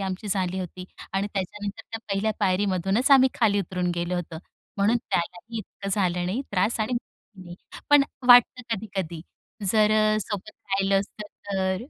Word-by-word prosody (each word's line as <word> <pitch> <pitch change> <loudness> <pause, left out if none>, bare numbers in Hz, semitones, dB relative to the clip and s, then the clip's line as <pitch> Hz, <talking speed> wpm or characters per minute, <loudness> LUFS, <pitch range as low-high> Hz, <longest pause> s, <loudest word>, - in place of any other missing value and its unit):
आमची 190 +1 -4
झाली 185 -2 0
होती 180 0 -7 0.3
आणि 195 +1 0
त्याच्यानंतर 205 +2 -4
त्या 225 - -4
पहिल्या 215 +2 0
पायरीमधूनच 195 +5 +1
आम्ही 265 -1 +7
खाली 210 -4 +2
उतरून 180 -1 -2
गेलो 175 +1 -2
होतो. 170 -2 -4 0.4
म्हणून 210 +4 +3
त्यालाही 180 +7 -2
इतकं 200 -1 -8
झालं 180 -3 +1
नाही 200 +8 -1
त्रास 200 +4 +1
आणि 215 +4 -1
मलाही 215 -5 -8
नाही. 175 0 -10 0.3
पण 290 -1 +8 0.3
वाटतं 245 +1 +7
कधी-कधी 190 -6 -5 0.5
जर 215 -1 +4
अ, 215 0 +3
सोबत 205 +1 -5 0.2
राहिलं 195 0 +2
असतं 205 +2 -8 0.3
तर. 190 +1 0
195 Hz, 155 wpm, -25 LUFS, 185-215 Hz, 0.5 s, पण